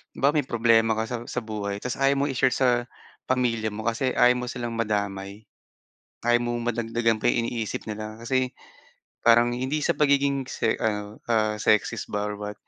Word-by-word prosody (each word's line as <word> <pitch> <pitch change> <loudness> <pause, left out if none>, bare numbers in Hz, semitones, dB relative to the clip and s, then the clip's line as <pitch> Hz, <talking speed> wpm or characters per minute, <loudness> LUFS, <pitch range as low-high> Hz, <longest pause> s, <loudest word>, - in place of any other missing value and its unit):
halimbawa 140 +2 +3
may 145 - +1
problema 115 -1 +3
ka 110 - 0
sa, 120 - -2
sa - - -2
buhay 100 -2 -4
tapos 125 - -3
ayaw 135 0 +3
mo - - +2
i-share 130 0 +2
sa 120 -2 +2 0.4
pamilya 120 -4 +1
mo 110 +1 -6
kasi 120 +3 0
ayaw 125 0 +6
mo 125 0 -3
silang 120 -1 -4
madamay. 100 -2 -3 0.8
Ayaw 120 0 +4
mong 120 0 -1
madagdagan 115 -1 0
pa 120 - +2
yung 120 -1 +2
iniisip 115 -3 -3
nila 110 0 -6
kasi 130 0 0 0.7
parang 120 +1 +6
hindi 130 +5 -2
sa - - +1
pagiging 140 -2 +2
se 115 - -1
ano, 105 -2 -2
ah, 110 -2 +1
sexist 105 0 +1
ba 105 - -1
or 105 - -5
what, 105 0 -5
115 Hz, 180 wpm, -25 LUFS, 110-125 Hz, 0.8 s, ayaw